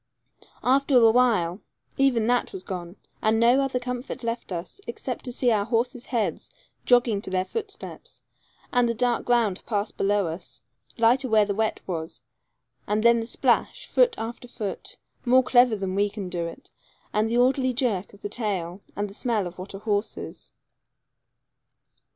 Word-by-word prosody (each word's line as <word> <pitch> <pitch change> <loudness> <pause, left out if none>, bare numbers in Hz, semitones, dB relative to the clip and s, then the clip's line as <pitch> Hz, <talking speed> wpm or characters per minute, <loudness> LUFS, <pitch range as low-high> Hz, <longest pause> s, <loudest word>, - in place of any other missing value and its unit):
After 270 +1 +4
awhile 225 -6 +4 0.3
even 260 -5 +3
that 245 +1 +1
was 185 - -5
gone, 175 -1 -6 0.3
and 220 +1 +2
no 240 +4 +5
other 270 -2 0
comfort 250 +1 -5
left 230 -2 -3
us 175 - -6
except - - -5
to 250 - -4
see 245 0 +2
our 210 -2 +2
horses' 245 +2 -1
heads 235 -4 -1 0.4
jogging 240 -4 +4
to - - -6
their 185 0 0
footsteps, 415 - -7 0.5
and 245 -1 +3
the 235 - -1
dark 245 0 0
ground 230 -6 +2
pass 210 -1 -1
below 200 0 +1
us, 165 +2 -7 0.3
lighter 250 +3 +3
where 215 -1 +5
the 200 - -1
wet 220 +2 -1
was; 165 -3 -5 0.6
and 210 +1 0
then 235 0 +6
the 225 - -4
splash, - - +1
foot 485 -2 +3
after 235 +2 -6
foot, 215 -5 -6 0.3
more 255 +1 +5
clever 245 -2 +5
than 195 -2 -3
we 205 +1 +2
can 200 -3 -6
do 170 -2 -2
it, 260 +11 -11 0.4
and 215 +1 +1
the 235 - +1
orderly 255 +1 +3
jerk 235 -7 -1
of 200 - -18
the - - -1
tail, 195 -5 -3
and 205 +1 -2
the 200 - -12
smell 220 -2 0
of 175 +1 -8
what 190 +1 -7
a - - -4
horse 205 0 -1
is. - - -8
225 Hz, 170 wpm, -25 LUFS, 200-245 Hz, 0.6 s, then